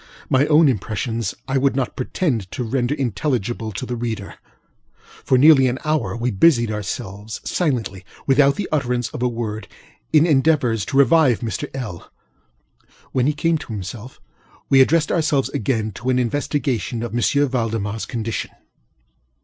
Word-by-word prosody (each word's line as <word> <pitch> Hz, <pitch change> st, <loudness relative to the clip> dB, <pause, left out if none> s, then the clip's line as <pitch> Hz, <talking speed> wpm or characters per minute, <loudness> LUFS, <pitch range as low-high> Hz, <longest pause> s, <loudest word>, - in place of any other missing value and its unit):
My 135 Hz, +2 st, +4 dB
own 155 Hz, +1 st, +5 dB
impressions 115 Hz, 0 st, -2 dB
I 135 Hz, 0 st, +1 dB
would 135 Hz, -1 st, +1 dB
not 135 Hz, -2 st, -2 dB
pretend 125 Hz, -, -2 dB
to 125 Hz, -, -3 dB
render 125 Hz, +3 st, -1 dB
intelligible 120 Hz, -3 st, -2 dB
to 130 Hz, -, -4 dB
the 125 Hz, -, -4 dB
reader. 115 Hz, -4 st, -4 dB, 0.9 s
For 130 Hz, -, +3 dB
nearly 135 Hz, -1 st, +6 dB
an 125 Hz, +1 st, -1 dB
hour, 145 Hz, -12 st, 0 dB
we 120 Hz, +1 st, -1 dB
busied 120 Hz, 0 st, +3 dB
ourselves, 105 Hz, 0 st, -5 dB
silentlyŌĆöwithout 135 Hz, -, 0 dB
the 205 Hz, -, -3 dB
utterance 125 Hz, -5 st, 0 dB
of -, -, -7 dB
a 125 Hz, -, +2 dB
wordŌĆöin 115 Hz, -, -2 dB
endeavors 135 Hz, -, +2 dB
to 135 Hz, -, -2 dB
revive 140 Hz, -2 st, +4 dB
Mr. 110 Hz, -5 st, -4 dB
LŌĆöl. 110 Hz, -10 st, -6 dB, 1.0 s
When 130 Hz, 0 st, +1 dB
he 150 Hz, -, +2 dB
came 160 Hz, +2 st, 0 dB
to 115 Hz, -, -8 dB
himself, 105 Hz, +5 st, -7 dB, 0.5 s
we 135 Hz, -1 st, +6 dB
addressed 155 Hz, +3 st, +3 dB
ourselves 150 Hz, -5 st, +1 dB
again 110 Hz, -1 st, -1 dB
to 120 Hz, +6 st, -5 dB
an 130 Hz, -, +2 dB
investigation 125 Hz, -2 st, -1 dB
of 120 Hz, -, -4 dB
M. 120 Hz, -, 0 dB
ValdemarŌĆÖs 115 Hz, -6 st, 0 dB
condition. 115 Hz, -2 st, -4 dB
125 Hz, 145 wpm, -21 LUFS, 110-140 Hz, 1.0 s, nearly